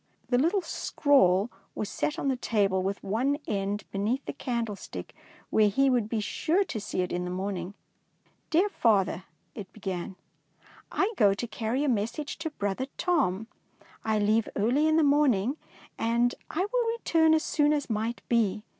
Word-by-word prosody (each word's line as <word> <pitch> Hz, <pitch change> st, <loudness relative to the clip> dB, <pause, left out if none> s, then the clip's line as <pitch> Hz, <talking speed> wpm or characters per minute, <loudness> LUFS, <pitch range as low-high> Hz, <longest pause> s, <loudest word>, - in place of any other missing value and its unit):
The 245 Hz, -1 st, +3 dB
little 350 Hz, +7 st, +2 dB
scrawl 245 Hz, -, +2 dB, 0.2 s
was 210 Hz, -, -2 dB
set 300 Hz, +7 st, -2 dB
on -, -, -2 dB
the 265 Hz, -, +2 dB
table 200 Hz, -6 st, +1 dB
with 195 Hz, +2 st, -3 dB
one 250 Hz, +8 st, 0 dB
end 200 Hz, 0 st, -2 dB
be 195 Hz, -, -3 dB
neath 235 Hz, +7 st, 0 dB
the -, -, -4 dB
candlestick, 235 Hz, -6 st, -4 dB, 0.4 s
where 215 Hz, -1 st, +4 dB
he 270 Hz, +6 st, +3 dB
would 235 Hz, -4 st, +1 dB
be 225 Hz, -, -1 dB
sure 330 Hz, -, +1 dB
to 230 Hz, -, -5 dB
see 200 Hz, -2 st, -2 dB
it 180 Hz, -, -2 dB
in 180 Hz, 0 st, -1 dB
the 180 Hz, -, -4 dB
morning. 185 Hz, 0 st, -4 dB, 0.4 s
" -, -, -40 dB
Dear 350 Hz, +6 st, +3 dB
Father," 195 Hz, -, +1 dB, 0.3 s
it 200 Hz, -4 st, -8 dB
began. 190 Hz, -3 st, -5 dB, 0.4 s
" -, -, -34 dB, 0.3 s
I 410 Hz, +4 st, +1 dB
go 200 Hz, -2 st, +5 dB
to 240 Hz, -, -3 dB
carry 230 Hz, +4 st, -2 dB
a -, -, +1 dB
message 235 Hz, +5 st, -2 dB
to 320 Hz, -, -3 dB
brother 205 Hz, -2 st, -3 dB
Tom. 265 Hz, -, +1 dB, 0.6 s
I 220 Hz, -1 st, +1 dB
leave 215 Hz, +2 st, +2 dB
early 250 Hz, +9 st, +2 dB
in 315 Hz, 0 st, +3 dB
the 320 Hz, -, +4 dB
morning, 280 Hz, -4 st, +3 dB, 0.4 s
and 235 Hz, +2 st, +2 dB, 0.2 s
will 455 Hz, +6 st, 0 dB
return 320 Hz, -7 st, +3 dB
as 315 Hz, -, +1 dB
soon 295 Hz, -1 st, +2 dB
as 295 Hz, -2 st, 0 dB
might 225 Hz, +1 st, -2 dB
be. 215 Hz, -3 st, +1 dB
230 Hz, 175 wpm, -28 LUFS, 200-290 Hz, 0.6 s, go